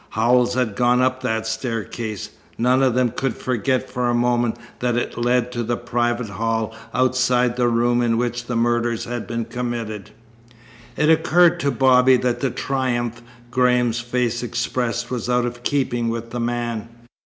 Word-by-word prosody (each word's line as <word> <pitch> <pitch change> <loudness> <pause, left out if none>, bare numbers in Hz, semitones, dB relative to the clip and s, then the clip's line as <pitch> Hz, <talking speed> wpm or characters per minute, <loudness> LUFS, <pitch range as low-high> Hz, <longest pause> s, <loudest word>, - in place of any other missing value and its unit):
Howells 120 +2 +2
had 125 -5 0
gone 125 +1 +3
up 130 0 +1
that 110 -3 -1
staircase. 110 -2 -4 0.3
None 125 +3 +3
of 130 -3 +2
them 125 -2 +2
could 130 0 -2
forget 130 +1 -1
for 125 -1 -1
a 120 - +1
moment 120 -1 +1 0.2
that 125 -1 0
it 120 - -2
led 120 +1 +1
to 120 -1 -3
the 120 +1 -1
private 120 -1 -1
hall 110 +2 -2 0.2
outside 125 -1 +2
the 125 -1 +2
room 120 +1 +2
in 115 -1 +1
which 120 0 -2
the 125 - -2
murders 120 0 0
had 120 -4 -5
been 115 0 -3
committed. 115 -3 -4 0.9
It 150 +1 +4
occurred 170 +2 +4
to 140 - +1
Bobby 130 0 +5
that 120 -1 -1
the 135 - 0
triumph 120 -3 -2 0.3
Graham's 125 -2 +2
face 120 0 -1
expressed 120 0 -2
was 125 -1 -3
out 125 0 +2
of 120 0 -5
keeping 120 -3 0
with 115 0 -4
the 120 - -4
man. 120 -1 -2
120 Hz, 165 wpm, -21 LUFS, 115-125 Hz, 0.9 s, Bobby